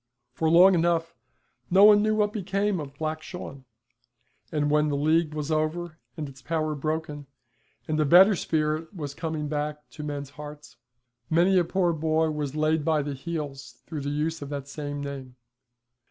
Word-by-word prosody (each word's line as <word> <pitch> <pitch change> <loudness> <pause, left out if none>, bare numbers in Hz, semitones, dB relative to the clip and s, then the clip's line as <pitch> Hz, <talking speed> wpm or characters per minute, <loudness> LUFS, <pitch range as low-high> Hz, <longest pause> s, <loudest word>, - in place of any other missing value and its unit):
For 160 +4 0
long 180 +4 +7
enough 165 -1 +1 0.6
no 190 +3 +6
one 210 0 +8
knew 215 0 +2
what 210 -1 +1
became 200 -1 -1
of 140 -2 -8
Black 155 0 -3
Shawn, 140 -6 -9 0.9
and 145 -1 0
when 150 0 +3
the 145 -1 -1
League 155 +1 +2
was 150 0 -3
over 155 +1 -2 0.2
and 155 -2 -4
its 135 0 -13
power 155 0 -1
broken, 150 -1 -4 0.6
and 155 0 -1
a - - +4
better 190 +7 +7
spirit 155 +2 -1
was 145 -5 -5
coming 160 -1 -3
back 150 0 -3
to 150 - -9
men's 145 -2 -5
hearts, 150 0 -11 0.5
many 175 +4 +3
a - - +3
poor 175 0 +1
boy 160 0 +1
was 150 -2 -4
laid 155 0 +1
by 155 -1 +1
the 145 0 -4
heels 140 -4 -6
through 155 -3 -5
the 140 - -3
use 155 +2 -2
of 140 - -6
that 140 -1 -5
same 145 0 -5
name. 135 -3 -7
155 Hz, 175 wpm, -26 LUFS, 145-165 Hz, 0.9 s, one